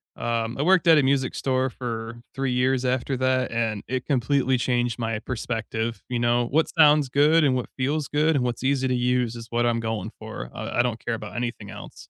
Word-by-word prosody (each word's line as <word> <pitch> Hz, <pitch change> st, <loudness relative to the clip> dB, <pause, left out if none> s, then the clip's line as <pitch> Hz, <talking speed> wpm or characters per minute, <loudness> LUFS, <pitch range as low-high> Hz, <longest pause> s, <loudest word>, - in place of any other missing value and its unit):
um, 115 Hz, 0 st, -2 dB
I -, -, -1 dB
worked 180 Hz, +1 st, +3 dB
at 160 Hz, -2 st, +7 dB
a -, -, +2 dB
music 135 Hz, -1 st, +1 dB
store 130 Hz, -1 st, 0 dB
for 115 Hz, -1 st, -6 dB
3 135 Hz, -1 st, -1 dB
years 130 Hz, +1 st, +1 dB
after 130 Hz, +1 st, 0 dB
that, 130 Hz, -1 st, +1 dB
and 115 Hz, -3 st, -1 dB
it 130 Hz, 0 st, -3 dB
completely 130 Hz, -1 st, +1 dB
changed 120 Hz, -1 st, 0 dB
my 115 Hz, -1 st, -1 dB
perspective, 115 Hz, -1 st, -4 dB
you 120 Hz, -1 st, -1 dB
know? 120 Hz, 0 st, +2 dB
What 155 Hz, +3 st, +1 dB
sounds 150 Hz, -3 st, +5 dB
good 150 Hz, +4 st, +4 dB
and 135 Hz, -3 st, +3 dB
what 125 Hz, -, -3 dB
feels 140 Hz, +3 st, -1 dB
good 150 Hz, +1 st, +2 dB
and 130 Hz, -, +1 dB
what's 120 Hz, +1 st, -3 dB
easy 135 Hz, -1 st, +1 dB
to 125 Hz, -, +1 dB
use 125 Hz, -1 st, 0 dB
is 115 Hz, -1 st, -8 dB
what 120 Hz, 0 st, 0 dB
I'm 115 Hz, -1 st, +1 dB
going 110 Hz, -2 st, -3 dB
for, 110 Hz, -, -7 dB
I -, -, -4 dB
I -, -, +8 dB
don't 120 Hz, -2 st, -3 dB
care 115 Hz, -, -1 dB
about -, -, -8 dB
anything 120 Hz, -4 st, -4 dB
else. -, -, -10 dB
125 Hz, 220 wpm, -24 LUFS, 115-135 Hz, -, I